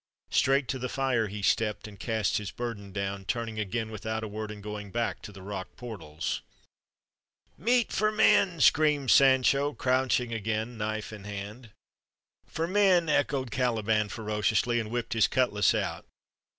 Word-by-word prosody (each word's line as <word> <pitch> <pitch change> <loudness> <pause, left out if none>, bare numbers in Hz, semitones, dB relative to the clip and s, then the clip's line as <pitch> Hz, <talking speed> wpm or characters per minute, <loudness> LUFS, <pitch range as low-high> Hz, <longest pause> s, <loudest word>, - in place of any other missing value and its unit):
Straight 135 0 +3
to 130 - -2
the 125 0 -3
fire 130 -5 0
he 100 0 -6
stepped 105 +2 +1
and 100 -2 -13
cast 110 -3 0
his 105 -2 -4
burden 105 -3 -6
down, 100 0 -3
turning 115 +1 -3
again 110 +2 -2
without 110 +1 -4
a - - -3
word 105 +1 -5
and 105 -1 -9
going 105 -1 -6
back 115 +3 -2
to - - -9
the 95 -2 -12
rock 100 0 -6
portals. 90 -11 -5 1.1
"Meat 235 - +1
for 215 0 +2
men!" 195 -5 +4
screamed 150 -4 +4
Sancho, 135 +2 +5
crouching 125 -2 +1
again, 110 +2 -2
knife 110 0 -4
in 105 -2 -10
hand. 105 +4 -7 0.8
"For 160 - -2
men!" 185 -3 +3
echoed 140 -4 +1
Caliban 110 -3 +1
ferociously, 110 +2 0
and 110 -2 -4
whipped 120 +2 -3
his 110 -1 +4
cutlas 115 -6 +2
out. - - -3
110 Hz, 155 wpm, -28 LUFS, 105-130 Hz, 1.1 s, Sancho